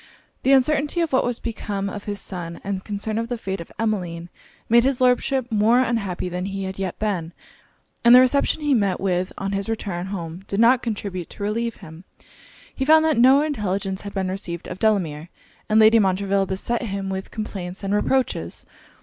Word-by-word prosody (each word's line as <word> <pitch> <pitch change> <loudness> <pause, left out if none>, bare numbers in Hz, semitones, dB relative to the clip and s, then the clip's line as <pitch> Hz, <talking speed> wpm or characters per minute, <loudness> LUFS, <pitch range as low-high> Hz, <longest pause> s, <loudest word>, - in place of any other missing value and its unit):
The 265 - +2
uncertainty 290 +4 +2
of 330 -4 -1
what 260 - +4
was 245 -1 -1
become 205 -4 -4
of 200 0 -6
his 205 -1 -3
son, 170 -3 -6
and 195 -1 -3
concern 210 +1 -4
for 230 0 -1
the 245 0 -3
fate 195 -4 -4
of 170 - -11
Emmeline, 180 -6 -2 0.4
made 235 +1 +5
his 270 -1 +1
Lordship 255 0 +2
more 220 +3 +4
unhappy 205 -8 -1
than 180 +1 -3
he 195 0 -4
had 190 0 -5
yet 190 -2 -3
been: 180 -6 -2 0.7
and 235 +1 +8
the - - +10
reception 280 +4 +2
he 295 -1 +2
met 200 -6 +1
with 185 -1 -1
on 195 0 -3
his 195 +1 -2
return 190 -5 -3
home 175 -2 -6
did 200 - -2
not 240 +2 +5
contribute 200 -6 -4
to - - -8
relieve 230 +2 -1
him; 160 +2 -12 0.7
he 265 - -2
found 315 +3 +5
that 310 -7 +2
no 265 +4 +6
intelligence 195 -9 -2
had 200 0 -8
been 190 -1 -1
received 175 -3 -5
of 185 - -7
Delamere; 175 -8 0 0.4
and 215 +1 +4
Lady 220 +1 +7
Montreville 195 0 +1
beset 195 +6 -2
him 195 -4 -4
with 190 0 -4
complaints 195 -4 -6
and 195 +1 -1
reproaches. 255 +5 0
205 Hz, 190 wpm, -23 LUFS, 190-235 Hz, 0.7 s, the